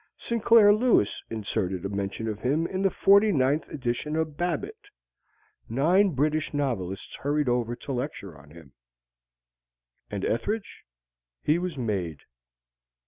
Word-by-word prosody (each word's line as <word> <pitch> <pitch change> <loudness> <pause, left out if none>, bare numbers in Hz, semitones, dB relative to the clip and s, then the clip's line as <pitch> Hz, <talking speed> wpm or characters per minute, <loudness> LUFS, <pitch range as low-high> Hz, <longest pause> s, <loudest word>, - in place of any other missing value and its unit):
Sinclair 230 -2 +5
Lewis 220 - +2
inserted 100 -4 -3
a - - -2
mention 100 +2 -3
of 105 -2 -3
him 145 +8 0
in 190 +2 -3
the 195 - +3
forty 200 +3 +5
ninth 140 -1 +1
edition 135 +2 -3
of 160 -2 -1
"Babbitt." 395 - -3 0.8
Nine 170 - +3
British 155 +2 0
novelists 100 -10 -3
hurried 145 0 0
over 120 -1 0
to 140 - -8
lecture 125 - -4
on 75 0 -16
him. 80 -4 -15 1.4
And 100 -2 -3
Ethridge? 205 - -3 0.6
He 155 +3 +2
was 175 -4 -4
made. 95 - -3
140 Hz, 130 wpm, -26 LUFS, -, 1.4 s, Sinclair